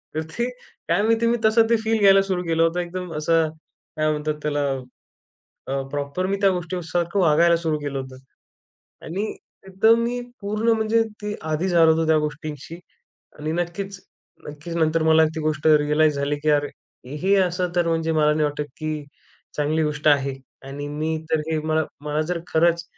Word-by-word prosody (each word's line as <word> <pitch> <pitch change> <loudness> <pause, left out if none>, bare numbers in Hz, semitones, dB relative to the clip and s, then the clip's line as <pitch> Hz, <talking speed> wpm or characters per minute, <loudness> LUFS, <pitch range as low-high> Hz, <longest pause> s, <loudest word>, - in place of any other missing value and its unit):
तर 155 - 0
ते 235 +9 -1 0.4
काय - - +3
माहिती 225 +1 +2
मी 235 +1 +2
तसं 225 +1 +5
ते 235 - +5
फील 225 0 +1
घ्यायला 195 -1 +6
सुरू 185 -2 -2
केलं 165 -1 +1
होतं 165 +2 +1
.एकदम 180 0 -5
असं 160 +1 +2 0.5
काय 155 0 +2
म्हणतात 150 0 -1
त्याला, 145 -1 0 1.1
अ, 135 +1 -1
प्रॉपर 145 +5 -2
मी 200 +1 0
त्या 200 - +5
गोष्टीसारखं 175 +1 -2
वागायला 170 0 +4
सुरू 160 -2 -1
केलं 145 -2 -4
होतं 130 -1 -8 0.9
आणि 190 +6 -3 0.4
एकदम 220 +5 +4
मी 245 +1 -2 0.2
पूर्ण 215 +3 -1
म्हणजे 220 +1 +2 0.2
ते 210 0 -3 0.2
आदि 155 +5 0
झालो 165 -2 +5
होतो 160 0 0
त्या 160 0 +4
गोष्टींशी 150 +1 -6 0.6
आणि 155 +1 -3
नक्कीच 175 +3 -4 0.5
नक्कीच 150 +3 -7
नंतर 160 0 +2
मला 160 0 +5
ती 160 - -3
गोष्ट 155 0 -1
रियलाइज 150 0 +4
झाली 140 +1 -1
की 155 - +2
अरे! 145 -1 +2 0.5
हे 190 +6 +2
असं 180 -1 0
तर 175 -1 +2
म्हणजे 165 0 0
मला 150 -1 +3
नाही 155 0 +1
वाटतं 150 0 -2
की 155 0 -3 0.7
चांगली 150 +2 +1
गोष्ट 150 0 0
आहे 140 -2 +3 0.3
आणि 145 +1 -6
मी 155 +2 -2
तर 160 - +2
हे 160 - 0
मला 155 0 +1 0.2
मला 150 +1 0
जर 175 -1 -1
खरंच 170 +1 +2
160 Hz, 175 wpm, -23 LUFS, 150-185 Hz, 1.1 s, घ्यायला